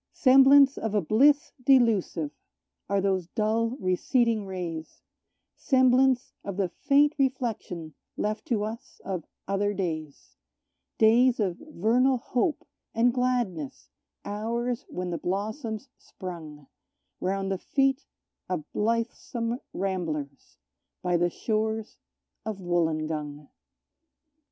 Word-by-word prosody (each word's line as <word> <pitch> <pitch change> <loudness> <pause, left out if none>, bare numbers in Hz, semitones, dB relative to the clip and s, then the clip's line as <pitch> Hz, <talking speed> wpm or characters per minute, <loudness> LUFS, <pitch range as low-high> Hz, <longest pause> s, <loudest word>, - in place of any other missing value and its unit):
Semblance 270 +1 +6
of 220 -2 -2
a 205 - +3
bliss 280 - +4
delusive 225 - +3 0.6
are 200 0 +2
those 190 -3 0
dull, 225 +4 0
receding 215 +4 +1
rays; 170 -4 -6 0.6
Semblance 260 -1 +3
of 200 -2 -5
the 195 -3 0
faint 285 - +3
reflection 230 - -2 0.2
left 215 +1 -2
to 220 -4 0
us 220 +2 -7
of 185 -4 -3 0.2
other 200 +1 0
days; 155 -6 -5 0.6
Days 235 +3 +5
of 190 -4 -1
vernal 255 -1 +2
hope 250 +6 -1 0.3
and 240 +1 +3
gladness, 240 - -2 0.3
hours 235 +3 -2
when 180 0 -4
the 170 - -3
blossoms 215 +6 -3
sprung 160 -6 -9 0.5
Round 195 +1 -1
the 190 - -1
feet 270 +4 +1 0.5
of 180 -4 -2
blithesome 230 +2 -1
ramblers 160 -7 -4 0.5
by 180 -1 +1
the 175 +1 +2
shores 220 +3 -2 0.4
of 220 -2 -4
Wollongong. 155 -4 -2
215 Hz, 105 wpm, -27 LUFS, 180-245 Hz, 0.6 s, Semblance